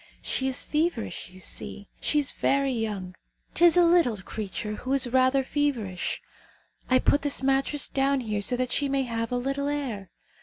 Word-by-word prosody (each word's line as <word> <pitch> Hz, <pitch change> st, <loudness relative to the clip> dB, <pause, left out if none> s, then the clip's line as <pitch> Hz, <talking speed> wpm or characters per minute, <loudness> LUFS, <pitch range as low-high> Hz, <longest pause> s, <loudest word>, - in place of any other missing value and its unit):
She 265 Hz, -, 0 dB
is 260 Hz, -, -1 dB
feverish, 305 Hz, -, -2 dB
you 185 Hz, 0 st, -15 dB
see. 200 Hz, +2 st, -5 dB
She 300 Hz, -, +2 dB
is 285 Hz, -3 st, +3 dB
very 275 Hz, -1 st, +1 dB
young. 205 Hz, -5 st, -3 dB, 0.4 s
'Tis 345 Hz, 0 st, +5 dB
a 350 Hz, -, +6 dB
little 335 Hz, -10 st, +3 dB
creature 210 Hz, +2 st, -5 dB
who 260 Hz, +1 st, -3 dB
is 270 Hz, -1 st, +5 dB
rather 260 Hz, +2 st, +3 dB
feverish. 255 Hz, -10 st, -2 dB, 0.7 s
I 255 Hz, -, +5 dB
put 285 Hz, +3 st, +2 dB
this 285 Hz, -2 st, 0 dB
mattress 270 Hz, +2 st, +2 dB
down 275 Hz, 0 st, +1 dB
here 210 Hz, -3 st, -2 dB
so 245 Hz, +5 st, +1 dB
that 250 Hz, -1 st, -2 dB
she 285 Hz, -, +1 dB
may 270 Hz, 0 st, +1 dB
have 230 Hz, -1 st, -3 dB
a 245 Hz, -, 0 dB
little 275 Hz, +3 st, -2 dB
air. 255 Hz, -10 st, -3 dB
260 Hz, 180 wpm, -26 LUFS, 225-280 Hz, 0.7 s, a